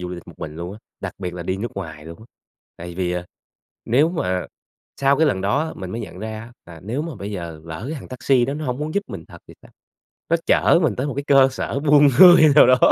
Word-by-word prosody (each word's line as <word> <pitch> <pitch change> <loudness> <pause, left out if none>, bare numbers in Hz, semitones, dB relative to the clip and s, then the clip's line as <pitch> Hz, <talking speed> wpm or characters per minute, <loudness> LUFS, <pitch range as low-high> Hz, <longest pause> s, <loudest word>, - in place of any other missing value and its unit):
du 90 - -5
lịch 90 -1 -9
một - - -12
mình 75 - -7
luôn 85 +2 -6
á, 105 - -11 0.2
đặc - - -5
biệt 90 -2 -5
là 90 - -6
đi 95 +2 -2
nước 115 +5 -5
ngoài 80 -6 -7
luôn 85 0 -10
á. 110 - -15 0.5
Tại 85 +1 -9
vì, 90 -1 -2
à, 90 0 -3 0.6
nếu 140 +7 +3
mà 90 - -2 0.5
sau 140 0 +3
cái 160 - +4
lần 95 -10 0
đó 105 +9 +1
á, - - -6
mình 95 -2 -7
mới 115 - -5
nhận 90 - -9
ra 110 +1 -6
á 115 +2 -12
là 85 -1 -12
nếu 120 +8 -3
mà 165 -2 -6
bây 100 +1 -7
giờ 85 -5 -7
lỡ 85 +5 -7
cái - - -4
thằng - - -12
taxi 130 0 +1
đó 135 +3 -3
nó 155 +1 -5
hổng 125 0 -3
muốn 150 +1 -4
giúp 200 - +1
mình - - -8
thật - - -13
thì - - -13
sao, - - -18 0.6
nó 170 - +3
chở - - +4
mình 130 -10 +1
tới 130 +3 -2
một 145 - -3
cái 140 - -3
cơ 135 -1 +6
sở 135 - -3
buôn 145 0 +5
người 175 -3 +9
nào 150 - +8
đó 130 0 +5
110 Hz, 275 wpm, -21 LUFS, 90-140 Hz, 0.6 s, người